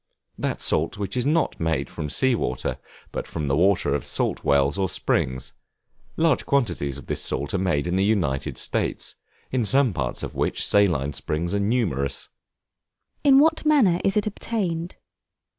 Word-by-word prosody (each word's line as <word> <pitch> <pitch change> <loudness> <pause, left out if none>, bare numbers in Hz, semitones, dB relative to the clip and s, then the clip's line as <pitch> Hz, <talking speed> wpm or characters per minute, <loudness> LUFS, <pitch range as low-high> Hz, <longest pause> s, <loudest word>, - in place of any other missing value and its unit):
That - - -2
salt - - 0
which 100 -1 -3
is 125 +1 0
not 160 +2 +1
made 80 -5 0
from 75 - -5
sea 130 - +2
water, 65 - -2 0.3
but - - -4
from 80 -2 -4
the 70 -1 +1
water 95 +4 +3
of - - -1
salt - - -2
wells 70 0 +3
or 95 -2 0
springs; 65 0 -1 0.6
large 160 -3 +2
quantities 85 - 0
of 70 - -11
this - - -2
salt 70 +2 -1
are 100 - +1
made 85 -6 0
in 85 +2 0
the 95 - +2
United 85 -11 0
States, - - -2 0.4
in 130 -2 +1
some 130 +1 +3
parts 65 -7 -3
of - - -5
which - - 0
saline 80 -9 +2
springs 80 +6 -3
are 100 - +1
numerous. 100 - -1 0.9
In 275 -2 +6
what 320 +3 +4
manner 255 - +4
is 195 +1 +2
it 210 - +2
obtained? 185 -5 -3
100 Hz, 170 wpm, -24 LUFS, -, 0.9 s, In